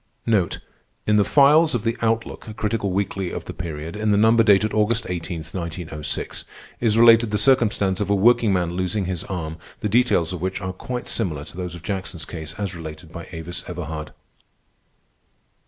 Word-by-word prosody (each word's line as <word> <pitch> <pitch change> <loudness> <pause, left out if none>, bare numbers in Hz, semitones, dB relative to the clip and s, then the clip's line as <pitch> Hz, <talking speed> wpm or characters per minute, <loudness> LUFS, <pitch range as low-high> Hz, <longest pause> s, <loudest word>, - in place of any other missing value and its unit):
In 105 +1 -1
the 105 - +5
files 150 +5 +5
of 115 - -1
the 115 0 0
Outlook, 115 0 -1
a 110 - -8
critical 105 -2 -1
weekly 95 -1 -1
of - - -6
the - - -6
period, 80 0 -6
in 105 0 -1
the 105 - +4
number 110 +2 +5
dated 105 -1 +4
August 110 +2 +1
18, 85 -2 -4
1906, 85 -2 -5 0.4
is 110 -2 +2
related 115 -1 +7
the 105 - 0
circumstance 105 -5 +3
of 100 - -1
a 100 - +4
workingman 100 -5 +3
losing 95 +3 -1
his 90 -2 -3
arm, 80 -4 -4 0.2
the - - 0
details 110 -7 +2
of 90 - -5
which 95 +1 -2
are 95 0 -4
quite 125 +6 -5
similar 80 -10 -2
to - - -11
those 90 -1 -5
of 85 - -11
Jackson's 95 -4 -4
case 80 -2 -7
as 100 -3 -3
related 80 0 -9
by 85 -1 -8
Avis 85 +1 -6
Everhard. 80 -3 -5
95 Hz, 175 wpm, -23 LUFS, 85-110 Hz, 0.4 s, related